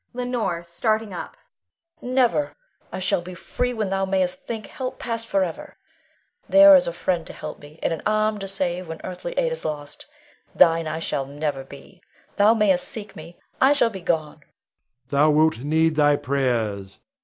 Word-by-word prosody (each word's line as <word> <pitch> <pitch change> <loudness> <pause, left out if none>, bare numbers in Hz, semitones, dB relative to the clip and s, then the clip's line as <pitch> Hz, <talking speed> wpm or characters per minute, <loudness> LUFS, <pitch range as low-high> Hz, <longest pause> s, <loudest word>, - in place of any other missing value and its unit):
Leonore 245 -9 -2
[starting 215 +4 -1
up]. 180 - -7 0.6
Never! 255 +3 +1 0.4
I - - -5
shall 185 -1 0
be 180 +1 -9
free 250 +7 -2
when 215 -5 -2
thou 195 0 0
mayst 190 -1 -1
think 220 -3 -4
help 255 -1 -6
past 230 -1 -4
forever. 190 -6 -2 0.7
There 295 0 +9
is 275 - +4
a - - -1
friend 175 0 -1
to - - -7
help 155 0 -8
me, 145 +2 -14
and - - +1
an 160 - -5
arm 215 0 +1
to 195 - -5
save, 185 -2 -2
when 160 0 -7
earthly 185 - -6
aid - - 0
is 485 - -5
lost. 145 -1 -6 0.5
Thine 165 -2 +4
I 155 - -3
shall 140 -4 -2
never 145 -1 -3
be! 140 +7 -14 0.4
Thou 210 +2 +5
mayst 195 -5 +2
seek 215 -2 -6
me; 165 +2 -11 0.2
I 270 +2 +6
shall 240 -5 +2
be 190 -3 -8
gone. 160 -3 -1
Rod. - - -26 0.7
Thou 145 +2 +4
wilt 155 -3 +3
need 160 +4 +1
thy 145 -1 +4
prayers. 115 -9 -2
180 Hz, 180 wpm, -23 LUFS, 155-220 Hz, 0.7 s, There